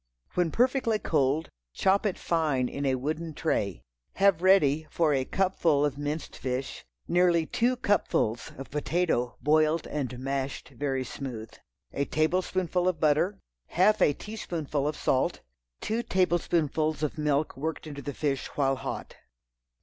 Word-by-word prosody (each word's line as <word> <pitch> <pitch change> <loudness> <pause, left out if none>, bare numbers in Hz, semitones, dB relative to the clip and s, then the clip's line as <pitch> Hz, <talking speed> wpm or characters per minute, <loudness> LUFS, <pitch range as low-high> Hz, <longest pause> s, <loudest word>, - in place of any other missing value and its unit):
When 180 -2 +1
perfectly 245 - +2
cold 150 -3 0 0.2
chop 195 +2 +3
it 195 - -2
fine 150 -7 +1
in 140 +2 -3
a 130 - +2
wooden 155 +4 -3
tray. 100 - -1 0.3
Have 195 -4 +4
ready, 160 -5 +4
for 160 -3 +2
a 135 -1 +1
cupful 170 -6 +2
of 145 -3 -1
minced 145 +2 -4
fish, 130 +1 -4 0.2
nearly 175 -2 +3
two 245 +9 +1
cupfuls 120 - 0
of 135 - -8
potato 150 -4 0
boiled 155 +2 +3
and 130 -4 -3
mashed 135 +1 -3
very 135 0 -2
smooth. 120 -4 -6 0.4
A 140 - 0
tablespoonful 180 +3 0
of 180 -4 0
butter. 155 +6 +2 0.3
Half 205 +5 +3
a 145 - +5
teaspoonful 160 -8 -3
of 150 - -1
salt. 130 - +1 0.4
Two 225 +2 -1
tablespoonfuls 160 - +1
of 150 +1 -2
milk 150 0 +1
worked 160 +4 -4
into 145 -2 -7
the 145 0 -6
fish 140 -3 -1
while 135 -2 +2
hot. - - -6
155 Hz, 140 wpm, -28 LUFS, 140-180 Hz, 0.4 s, a